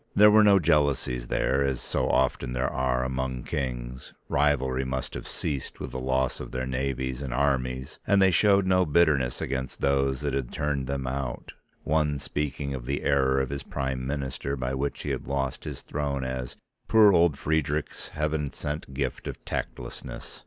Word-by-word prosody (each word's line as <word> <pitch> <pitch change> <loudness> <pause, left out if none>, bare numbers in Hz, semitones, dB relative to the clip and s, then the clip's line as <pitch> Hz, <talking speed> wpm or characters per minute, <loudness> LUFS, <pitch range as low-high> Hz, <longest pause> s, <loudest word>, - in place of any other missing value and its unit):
There 105 +1 +8
were 110 0 +7
no 100 -1 +7
jealousies 70 -7 +1
there 70 +3 +1
as 65 -2 0
so - - -1
often 65 -1 +1
there 65 +1 -1
are 65 -1 +1
among 65 -1 -2
kings, 65 -2 -4
rivalry 65 -3 +2
must 65 0 -3
have - - -6
ceased 70 -3 -4
with - - -5
the 65 - -4
loss 65 0 0
of - - -6
their 65 0 -3
navies 65 0 -2
and 70 -3 -4
armies, 65 -1 -1
and 100 +1 +5
they 95 -1 +6
showed 100 +2 +4
no 95 0 +4
bitterness 75 -6 +2
against 65 -1 -3
those 70 -1 +1
that 70 -2 -1
had 65 -3 -2
turned 70 -3 -1
them 70 -1 -2
out, 65 -1 -4 0.3
one 75 -2 +1
speaking 70 0 -3
of 65 -2 -6
the 70 +2 -1
error 65 -1 +3
of 65 0 -1
his 70 0 -3
Prime 65 -2 -3
Minister 70 -1 -3
by 65 -1 -2
which 70 +2 -2
he - - -2
had - - -4
lost 70 -1 -2
his - - -6
throne 70 -2 -2
as 65 -1 -4 0.3
"poor 110 -3 +7
old 85 -4 +4
Friedrich's 75 0 -1
Heaven 75 -1 -2
sent 75 -2 -5
gift 65 -2 -2
of - - -7
tactlessness." - - -6
70 Hz, 180 wpm, -27 LUFS, 65-75 Hz, 0.3 s, There